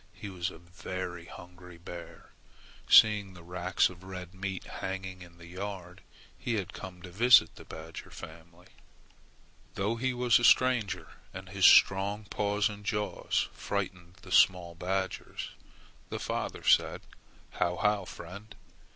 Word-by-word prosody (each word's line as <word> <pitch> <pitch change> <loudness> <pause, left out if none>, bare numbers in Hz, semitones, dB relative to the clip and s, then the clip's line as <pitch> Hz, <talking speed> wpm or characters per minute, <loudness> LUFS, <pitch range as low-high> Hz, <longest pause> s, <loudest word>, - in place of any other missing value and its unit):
He 100 - -7
was 90 -1 -3
a - - -11
very 90 0 -6
hungry 90 0 -12
bear. 85 0 -10 0.6
Seeing 105 -4 +6
the 85 - -12
racks 90 +1 +1
of 90 0 -12
red 90 -1 -8
meat 95 -1 -4
hanging 95 -1 -6
in 85 -1 -13
the 85 - -13
yard, 90 0 -7 0.4
he 120 - -1
had 100 -4 -3
come 90 -2 -9
to 90 - -9
visit 115 -4 +6
the - - -13
badger 80 +1 -9
family. 85 +2 -12 1.1
Though 105 +4 -1
he 130 +2 0
was 125 -1 +3
a - - -4
stranger 125 -6 +3 0.3
and 95 -1 -8
his 95 -1 +5
strong 100 +2 +5
paws 105 +1 0
and 105 -2 -8
jaws 105 +1 -1
frightened 90 -1 -4
the - - -11
small 90 -2 +4
badgers, 95 +2 -3 0.6
the - - -3
father - - -3
said, - - +3 0.5
"How, 85 - 0
how, 105 0 +1
friend! 100 +5 -10
95 Hz, 140 wpm, -30 LUFS, 90-100 Hz, 1.1 s, Seeing